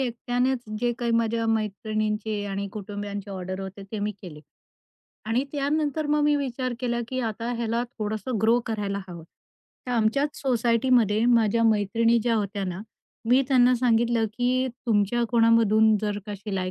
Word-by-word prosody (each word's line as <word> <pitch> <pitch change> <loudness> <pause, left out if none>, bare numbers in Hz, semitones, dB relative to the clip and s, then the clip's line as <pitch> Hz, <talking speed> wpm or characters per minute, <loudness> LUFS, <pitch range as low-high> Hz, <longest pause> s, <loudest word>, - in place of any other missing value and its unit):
एकट्यानेच 245 +1 0 0.2
जे 240 0 +1
काही 235 -1 -1
माझ्या 230 0 -1
मैत्रिणींचे 215 -1 -1
आणि 200 0 -3
कुटुंबियांचे 205 -1 -6
ऑर्डर 185 0 -5
होते 195 +1 -7
ते 215 - -3
मी 210 +1 -2
केले. 150 -5 -9 0.8
आणि 235 +5 0
त्यानंतर 295 +1 -1
मग 300 0 +2
मी 295 0 +4
विचार 255 -2 -2
केला 240 -1 -1
की 255 0 -2
आता 230 +1 -3
ह्याला 235 0 -1 0.2
थोडंसं 215 +2 -3
ग्रो 230 +2 +4
करायला 205 -3 -2
हवं. 170 -2 -8 0.6
तर - - -4
आमच्याच 245 +6 +1
सोसायटीमध्ये 235 -3 +2
माझ्या 230 -1 +3
मैत्रिणी 225 +2 +3
ज्या 235 -1 +1
होत्या 200 -1 -2
ना 185 +1 -4 0.5
मी 255 +3 +5
त्यांना 250 -1 +5
सांगितलं 235 -1 +2
की 255 +1 +1 0.2
तुमच्या 225 +2 +2
कोणामधून 225 -2 +4
जर 210 -1 -2
का 205 - -4
शिलाई 190 -2 -3
225 Hz, 150 wpm, -25 LUFS, 205-245 Hz, 0.8 s, मी